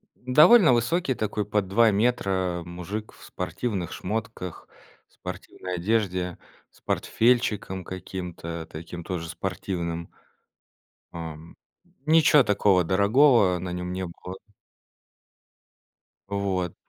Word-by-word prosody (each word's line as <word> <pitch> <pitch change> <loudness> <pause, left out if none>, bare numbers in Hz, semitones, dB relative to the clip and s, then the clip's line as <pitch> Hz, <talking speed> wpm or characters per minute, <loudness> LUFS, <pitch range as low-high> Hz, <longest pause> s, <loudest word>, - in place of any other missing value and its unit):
Довольно 150 - +6
высокий 130 +3 +1
такой, 105 -1 -2
под 105 -2 0
2 110 +3 +4
метра 95 -5 0
мужик, 90 +5 -6
в - - -17
спортивных 100 -8 -4
шмотках. 105 -4 -5 0.4
В - - -34
спортивной 90 -1 -7
одежде. 90 -2 -1 0.3
С - - -25
портфельчиком 110 -5 +1
каким-то 90 -3 -6
таким, 85 +2 -8
тоже 85 -2 -4
спортивным. 85 -1 -4 1.1
Ам, 80 -1 -8 0.5
ничего 155 -3 +6
такого 100 -3 +3
дорогого 100 - +4
на 90 0 -5
нём 90 0 -4
не 95 0 -3
было. 90 +2 -9 1.9
Вот. 95 -3 -2
95 Hz, 100 wpm, -26 LUFS, 90-110 Hz, 1.9 s, Довольно